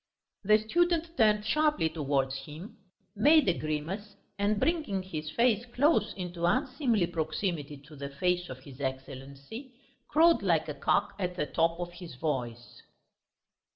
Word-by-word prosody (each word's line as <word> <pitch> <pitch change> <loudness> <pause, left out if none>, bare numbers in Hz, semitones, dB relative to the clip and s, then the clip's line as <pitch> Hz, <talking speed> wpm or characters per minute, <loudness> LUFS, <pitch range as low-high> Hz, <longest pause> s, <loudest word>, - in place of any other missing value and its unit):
The 215 +2 +6
student 335 +8 0
turned 210 -4 +3
sharply 300 - +2
towards 140 -4 -1
him, 160 +7 -10 0.4
made 295 +7 +5
a 180 - +4
grimace, 170 +8 -4 0.2
and 205 +1 +1
bringing 300 - 0
his 155 -4 -5
face 235 +2 +2
close 285 +7 +2
into 175 -2 -4
unseemly 255 - +1
proximity 155 -2 -3
to 150 +1 -13
the 140 0 -6
face 180 +5 -1
of 130 0 -9
his 135 0 -12
Excellency, 140 - -6 0.3
crowed 330 +2 +5
like 170 -6 +2
a 150 - -3
cock 150 +2 +1
at 180 -2 -2
the 150 - -1
top 165 +3 0
of 175 0 -5
his 175 -6 -10
voice. 125 -5 -4
180 Hz, 145 wpm, -29 LUFS, 150-225 Hz, 0.4 s, The